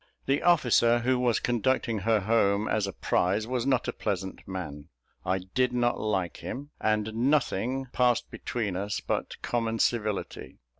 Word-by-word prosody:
The 135 +1 +1
officer 120 -8 +4
who 130 +1 +1
was 120 -2 +2
conducting 120 -1 0
her 110 +2 +2
home, 105 0 +2
as 105 -2 0
a - - -3
prize, 95 +4 0
was 125 +1 -2
not 130 -3 +2
a - - -1
pleasant 95 -1 -4
man; 75 -5 -6 0.3
I 95 0 +1 0.2
did 130 -1 +2
not 120 0 +1
like 95 -5 -1
him: 145 +3 -7
and 110 0 0
nothing 130 0 +1
passed 125 -1 +2
between 105 -6 -3
us 100 +2 -2
but - - -3
common 115 -2 -1
civility. 110 -3 -1
115 Hz, 155 wpm, -28 LUFS, 100-125 Hz, 0.3 s, officer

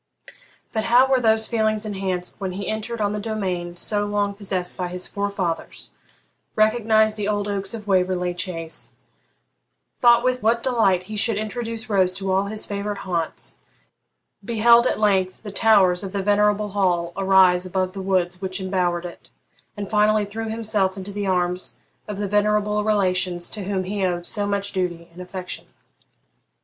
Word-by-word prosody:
But 220 -1 -1
how 245 +3 +6
were 265 -1 +3
those 220 -1 +3
feelings 220 -2 0
enhanced 190 -3 -3
when 190 -2 -3
he 200 +1 -5
entered 220 +2 -3
on 205 -1 0
the 210 - -2
domain 185 -5 -3
so 205 +3 0
long 205 -1 0
possessed 190 -3 -3
by 180 - -3
his 180 +1 -4
forefathers; 200 -4 -3 0.6
recognised 220 0 +3
the 205 -1 -2
old 205 -1 -1
oaks 200 +2 -3
of 215 -2 -8
Waverley 180 -2 +1
Chace; 165 -2 -4 1.0
thought 240 -1 +6
with 255 0 +1
what 230 +2 +2
delight 210 -8 +2
he 215 +4 -7
should 215 0 +2
introduce 225 +2 -4
Rose 190 -4 +2
to 195 0 -2
all 190 +1 +2
his 210 +1 -3
favourite 205 0 -3
haunts; 170 -3 -3 0.8
beheld 235 +3 +5
at - - -1
length 190 -3 +1
the 205 - -6
towers 195 -4 +4
of 195 0 -6
the 200 -1 -1
venerable 210 +1 +2
hall 180 -4 0
arise 190 -2 +4
above 185 0 -1
the 195 - -5
woods 185 -1 0
which 185 0 -3
embowered 180 -2 -1
it, 175 - -10 0.5
and 200 -1 -5
finally 210 0 +3
threw 220 +2 -5
himself 215 -4 0
into 195 +1 -6
the 205 0 -3
arms 180 -1 0 0.3
of 210 -2 -5
the 205 0 -2
venerable 210 +1 +1
relations 185 -4 +1
to 205 -3 -4
whom 190 -1 -1
he 195 +1 -3
owed 175 -1 -1
so 205 +1 0
much 200 0 -1
duty 175 -2 -3
and 180 - -10
affection! 180 0 -7
200 Hz, 165 wpm, -23 LUFS, 185-215 Hz, 1.0 s, how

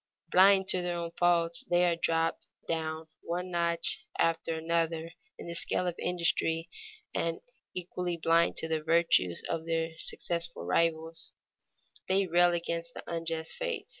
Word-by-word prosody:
Blind 190 +1 +6
to 180 - +3
their 175 -1 -2
own 170 -1 -4
faults, 170 -1 +2
they 175 0 +4
are 170 -1 +2
dropped 165 0 0 0.2
down 160 -1 -2 0.2
one 180 +2 -4
notch 170 -1 -1
after 165 0 +1
another 165 0 -1 0.3
in - - -9
the 170 - -5
scale 175 +1 +2
of 175 - 0
industry, 165 -2 0 0.4
and, 165 0 -1 0.4
equally 180 -1 -3
blind 165 +1 +3
to 160 - +1
the 160 -1 -1
virtues 160 - +2
of 165 0 -3
their 165 0 0
successful 170 - -1
rivals, 160 - 0 0.7
they 190 +1 +3
rail 175 0 +4
against 170 0 -3
the - - -7
unjust 165 -1 -3
fates. - - -4
170 Hz, 145 wpm, -30 LUFS, 165-175 Hz, 0.7 s, Blind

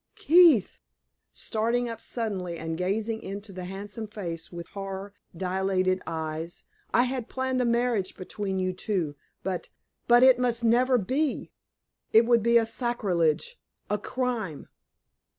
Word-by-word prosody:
"Keith!" 325 - +5 0.5
starting 235 +2 -1
up 230 -1 -6
suddenly 190 -7 -3
and 165 0 -4
gazing 215 +6 -1
into 200 +2 -7
the 185 -1 -6
handsome 200 +4 -6
face 170 -6 -6
with 170 -1 -7
horror 195 0 -6 0.2
dilated 185 0 0
eyes, 160 +1 -4 0.3
"I 240 - +4
had 250 -2 -3
planned 260 -1 -1
a - - +1
marriage 235 -4 +1
between 190 +1 -4
you 185 0 0
two; 180 -6 -2 0.3
but 185 -2 -3 0.4
but 240 +1 +7
it 260 -1 +7
must 240 -1 0
never 250 +3 +4
be. 265 +8 -1 0.6
It 225 +1 +7
would 235 -1 +4
be 235 +2 +3
sacrilege 225 - 0 0.3
a 210 - +1
crime!" 225 - -3
210 Hz, 135 wpm, -27 LUFS, 185-240 Hz, 0.6 s, but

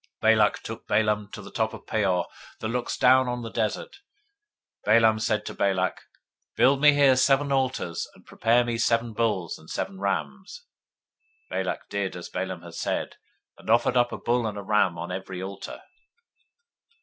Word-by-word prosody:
023:028 - - +6
Balak - - +3
took - - -8
Balaam 105 -1 +1
to 110 - -8
the - - -11
top 110 -1 -1
of - - -13
Peor, 95 -5 +1 0.3
that 110 - -3
looks 125 +1 -2
down 130 +1 +5
on 125 -1 -3
the 115 - -6
desert. 110 - -3 0.9
023:029 110 +2 +6
Balaam 110 -1 +4
said 110 -1 0
to - - -5
Balak, 95 -2 0 0.6
Build 135 +2 +4
me 150 -1 +8
here 140 -2 +5
seven 135 +2 +3
altars, 130 -10 -1
and - - -20
prepare 120 +2 +2
me 120 - -2
here 115 - -2
seven 115 0 +1
bulls 105 -7 -1
and 80 - -16
seven 95 - -4
rams. 190 - -3 0.9
023:030 95 - -1
Balak - - -4
did 100 -2 -2
as 90 - -8
Balaam 95 -2 -4
had 85 -1 -11
said, - - -3 0.4
and - - -11
offered 120 +2 +3
up 120 -1 +3
a - - -4
bull 120 -1 0
and 105 -1 -5
a 100 - -5
ram 95 -4 +2
on 85 - -5
every 95 0 -5
altar. 95 +1 -7
110 Hz, 185 wpm, -26 LUFS, 95-125 Hz, 0.9 s, me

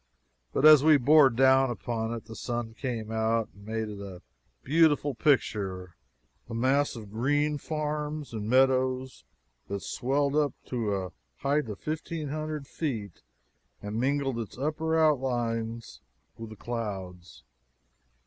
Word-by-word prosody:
But 140 - +1
as 155 -2 +9
we 155 -1 +7
bore 145 +2 +6
down 130 +1 +4
upon 115 -1 -3
it 115 -2 -5
the 110 0 -10
sun 120 -1 -4
came 115 -3 -4
out 110 0 0
and 100 +1 -16
made 110 0 -2
it 105 -1 -7
a 95 -3 -9 0.4
beautiful 145 -1 +3
picture 100 - 0 0.5
a 115 - -5
mass 135 +5 +2
of 105 -4 -9
green 145 +6 +1
farms 150 -2 -3
and 110 -1 -4
meadows 130 0 +2 0.4
that 100 -1 -4
swelled 140 +3 0
up 145 -4 +1
to 110 -5 -1
a 95 -2 -4 0.3
height 140 -2 +1
of 105 - -5
fifteen 155 -1 -4
hundred 155 -1 -4
feet 115 - -4 0.6
and 105 +2 -4
mingled 135 -1 0
its 115 0 -7
upper 155 +3 -1
outlines 120 -6 0 0.3
with 115 -1 -8
the 110 - -10
clouds. 95 -7 -6
125 Hz, 140 wpm, -28 LUFS, 110-145 Hz, 0.6 s, as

